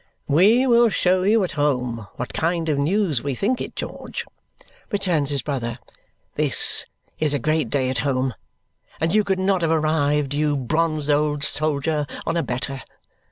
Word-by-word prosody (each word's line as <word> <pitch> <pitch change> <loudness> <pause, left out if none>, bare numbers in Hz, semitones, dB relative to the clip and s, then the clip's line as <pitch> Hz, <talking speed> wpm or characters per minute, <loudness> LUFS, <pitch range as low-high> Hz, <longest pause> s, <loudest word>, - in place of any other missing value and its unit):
"We 205 - +4
will 235 -2 +5
show 185 -2 +2
you 210 +3 +3
at 180 - -2
home 125 -7 -1
what 125 - -6
kind 165 0 -1
of 145 -2 +1
news 160 - +1
we 140 -2 -3
think 245 - -1
it, - - -6
George," - - -6 0.6
returns 180 - 0
his 140 -3 +1
brother. 120 -5 -3 0.6
"This - - +2 0.3
is 150 -2 +2
a - - +2
great 155 -1 0
day 135 -3 0
at 130 -2 -1
home, 130 -1 0 0.7
and 160 +2 0
you 215 0 +4
could 195 -2 0
not 190 -1 +1
have 165 - +1
arrived, 150 -3 +1
you 145 0 +1
bronzed 155 +2 0
old 145 0 +1
soldier, 150 0 +1 0.2
on 165 - -1
a 170 - +1
better. 130 0 -3
150 Hz, 165 wpm, -22 LUFS, 140-175 Hz, 0.7 s, will